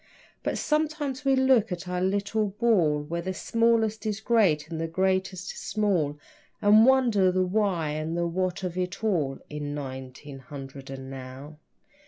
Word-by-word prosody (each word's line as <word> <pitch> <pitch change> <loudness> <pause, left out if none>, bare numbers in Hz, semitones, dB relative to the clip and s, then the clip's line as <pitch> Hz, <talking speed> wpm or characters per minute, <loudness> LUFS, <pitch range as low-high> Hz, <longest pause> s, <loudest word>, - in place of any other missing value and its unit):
But - - -2
sometimes 300 -3 -1
we 270 -1 +3
look 260 -5 +3
at 180 +1 -5
our 180 0 -2
little 205 +3 0
ball 190 -9 +2
Where 170 +3 -3
the 185 +2 -4
smallest 230 -1 +1
is 210 -1 -2
great 200 -10 +2
and 160 -1 -5
the 165 - -1
greatest 185 +1 -1
small 180 -9 0 0.4
And 215 +3 +6
wonder 235 -8 +4
the 185 0 +1
why 185 -5 0
and 155 +2 -3
the 170 - +1
what 185 +2 -2
of 180 -2 -3
it 180 +4 -3
all 155 -11 0
In 145 -1 -5
nineteen 130 0 -7
hundred 135 0 -9
and 135 0 -7
now. 135 +3 -9
185 Hz, 160 wpm, -27 LUFS, 150-215 Hz, 0.4 s, And